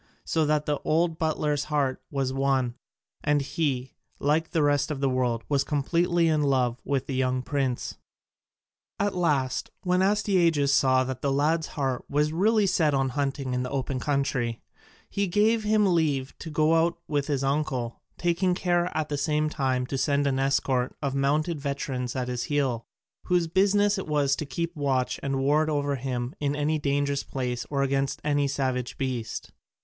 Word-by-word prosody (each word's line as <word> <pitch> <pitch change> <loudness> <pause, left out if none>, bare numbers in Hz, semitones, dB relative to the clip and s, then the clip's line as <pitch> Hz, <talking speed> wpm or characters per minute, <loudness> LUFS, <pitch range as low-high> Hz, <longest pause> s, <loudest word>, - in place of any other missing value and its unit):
So 160 -2 +1
that 150 0 +1
the 150 -1 0
old 165 +1 +1
butler's 150 -2 0
heart 145 -4 0
was 135 -4 -1
won, 135 -2 +1 0.5
and 145 0 +3
he, 140 -3 -2 0.2
like 155 +3 +1
the 160 - +1
rest 145 0 +2
of 150 -3 -3
the 140 - +1
world, 125 -3 0
was 140 -2 +2
completely 170 +4 +1
in 155 -2 +2
love 130 -4 +1
with 140 -1 -1
the 135 - -4
young 130 -1 0
prince. 135 -3 -2 1.0
At 205 0 +1
last 145 -7 0
when 180 0 +2
Astyages 175 -8 +3
saw 130 -1 +4
that 130 -1 -5
the 140 - 0
lad's 155 +4 +1
heart 135 -3 -1
was 150 +2 +1
really 210 +5 +3
set 155 -6 +2
on 135 -1 +1
hunting 135 -1 -2
in 125 - 0
the 125 - -3
open 135 -1 -2
country, 135 -5 -1 0.5
he 200 0 -1
gave 215 +4 +2
him 210 -3 +3
leave 140 -6 0
to 165 - -7
go 155 +1 +2
out 165 +1 +2
with 145 -2 -1
his 140 -3 0
uncle, 135 -4 -1 0.2
taking 175 +1 +1
care 175 -1 +1
at 155 -1 0
the 145 -1 -2
same 150 +1 +1
time 130 -4 0
to 135 +1 -3
send 145 0 +1
an 135 -1 +1
escort 135 -2 +1
of 140 -1 -1
mounted 150 +3 0
veterans 135 -3 -3
at 125 -1 -2
his 125 -1 -2
heels, 135 -6 0 0.4
whose 180 -2 +2
business 200 +4 +3
it 190 - -6
was 145 -2 +2
to 155 - -5
keep 170 +6 -3
watch 130 -4 0
and 140 0 -1
ward 150 +4 +2
over 145 -2 0
him 125 0 -3
in 145 0 0
any 150 +1 0
dangerous 140 -1 0
place 125 -2 -3
or 140 -1 0
against 135 0 0
any 145 -1 +1
savage 130 -3 -2
beast. 125 -4 -3
145 Hz, 175 wpm, -26 LUFS, 130-160 Hz, 1.0 s, saw